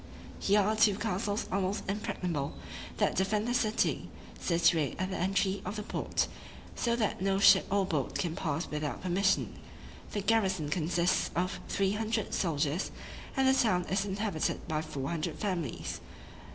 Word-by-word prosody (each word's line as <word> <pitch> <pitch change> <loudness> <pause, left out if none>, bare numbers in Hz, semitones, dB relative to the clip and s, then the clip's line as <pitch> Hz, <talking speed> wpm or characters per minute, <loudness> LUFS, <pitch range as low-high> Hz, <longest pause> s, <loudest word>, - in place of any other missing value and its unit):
Here 205 +1 +4
are 210 +2 +1
two 215 -2 +5
castles 205 0 -1
almost 195 +1 -1
impregnable, 180 -7 -2 0.4
that - - +2
defend 210 +4 +1
the 240 - 0
city, 225 -2 +1 0.3
situate 165 -3 +2
at 185 +1 -2
the - - -2
entry 195 +1 +1
of - - -4
the 210 - -4
port, - - -1 0.5
so 235 -1 +1
that 215 -5 -1
no 195 0 +2
ship 200 - +6
or 200 0 +2
boat 150 -8 -1
can 170 -3 -1
pass 165 - -1
without 150 +1 -3
permission. 190 +2 +1 0.5
The 205 - -1
garrison 190 -7 +1
consists 170 +2 +1
of 180 +2 -1
three 195 -1 +1
hundred 220 0 -1
soldiers, 160 0 0 0.5
and 265 0 +4
the 265 - +6
town 215 -9 +2
is 190 +1 +2
inhabited 200 -4 -2
by 155 -2 0
four 140 -3 -4
hundred 160 0 -2
families. 175 - -3
190 Hz, 155 wpm, -31 LUFS, 170-210 Hz, 0.5 s, ship